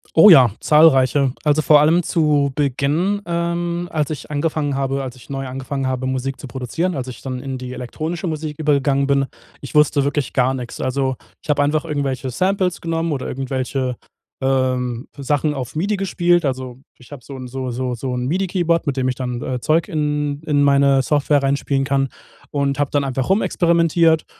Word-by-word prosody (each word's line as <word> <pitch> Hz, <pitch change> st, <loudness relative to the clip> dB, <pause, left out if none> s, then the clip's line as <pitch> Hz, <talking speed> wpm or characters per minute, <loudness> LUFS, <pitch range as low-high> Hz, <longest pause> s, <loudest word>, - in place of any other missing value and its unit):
Oh 165 Hz, +6 st, +9 dB
ja, 130 Hz, -, +8 dB
zahlreiche. 140 Hz, -3 st, +4 dB
Also 150 Hz, +1 st, +3 dB
vor 150 Hz, -1 st, +6 dB
allem 160 Hz, +4 st, +3 dB
zu 150 Hz, -4 st, +2 dB
Beginn, 150 Hz, +8 st, 0 dB
ähm, 170 Hz, 0 st, -2 dB
als 150 Hz, -3 st, 0 dB
ich 150 Hz, -2 st, -6 dB
angefangen 150 Hz, -1 st, -1 dB
habe 135 Hz, 0 st, -1 dB
als 130 Hz, -1 st, -6 dB
ich 125 Hz, -, -17 dB
neu 135 Hz, -1 st, -4 dB
angefangen 135 Hz, +1 st, -4 dB
habe, 130 Hz, 0 st, -2 dB
Musik 130 Hz, +1 st, -2 dB
zu 140 Hz, -, -9 dB
produzieren, 145 Hz, +9 st, -2 dB
als 130 Hz, -2 st, -4 dB
ich 125 Hz, -2 st, -9 dB
dann 130 Hz, -2 st, -5 dB
in 135 Hz, 0 st, -5 dB
die 125 Hz, 0 st, -7 dB
elektronische 155 Hz, +8 st, -4 dB
Musik 155 Hz, -2 st, -4 dB
übergegangen 140 Hz, -2 st, +2 dB
bin, 140 Hz, -1 st, +2 dB, 0.3 s
ich 140 Hz, -, -9 dB
wusste 150 Hz, -1 st, +4 dB
wirklich 145 Hz, 0 st, -1 dB
gar 130 Hz, 0 st, +2 dB
nix. 125 Hz, -2 st, -6 dB
Also, 130 Hz, 0 st, -1 dB, 0.3 s
ich -, -, -18 dB
hab 145 Hz, -1 st, +3 dB
einfach 150 Hz, +1 st, +1 dB
irgendwelche 140 Hz, -3 st, -2 dB
Samples 185 Hz, +5 st, 0 dB
genommen 165 Hz, -1 st, -1 dB
oder 135 Hz, -2 st, -4 dB
irgendwelche, 130 Hz, -1 st, -2 dB, 0.5 s
ähm, 130 Hz, -2 st, 0 dB
Sachen 145 Hz, +2 st, 0 dB
auf 130 Hz, -2 st, -6 dB
MIDI 200 Hz, +6 st, 0 dB
gespielt. 175 Hz, -3 st, +1 dB
Also 130 Hz, -2 st, -3 dB, 0.2 s
ich 125 Hz, +3 st, -13 dB
habe 130 Hz, -4 st, -10 dB
so 140 Hz, -, -9 dB
'n 130 Hz, -, -7 dB
so 130 Hz, 0 st, -4 dB
so 125 Hz, +1 st, -2 dB
so 125 Hz, +2 st, -4 dB
'n 125 Hz, 0 st, -2 dB
MIDI 185 Hz, +6 st, 0 dB
Keyboard, 170 Hz, -4 st, 0 dB
mit 140 Hz, -, -1 dB
dem 130 Hz, -1 st, +1 dB
ich 130 Hz, -, -1 dB
dann, 125 Hz, -2 st, -4 dB
äh, 125 Hz, 0 st, -3 dB
Zeug 160 Hz, +5 st, +2 dB
in 150 Hz, -3 st, -1 dB
in 145 Hz, -2 st, +2 dB
meine 140 Hz, -1 st, +4 dB
Software 145 Hz, +1 st, +2 dB
reinspielen 135 Hz, 0 st, 0 dB
kann 135 Hz, 0 st, 0 dB, 0.4 s
und 140 Hz, -1 st, -1 dB
habe 145 Hz, -2 st, 0 dB
dann 145 Hz, -1 st, +1 dB
einfach 130 Hz, -1 st, -2 dB
rumexperimentiert. 170 Hz, -4 st, +3 dB
140 Hz, 190 wpm, -20 LUFS, 130-155 Hz, 0.5 s, Oh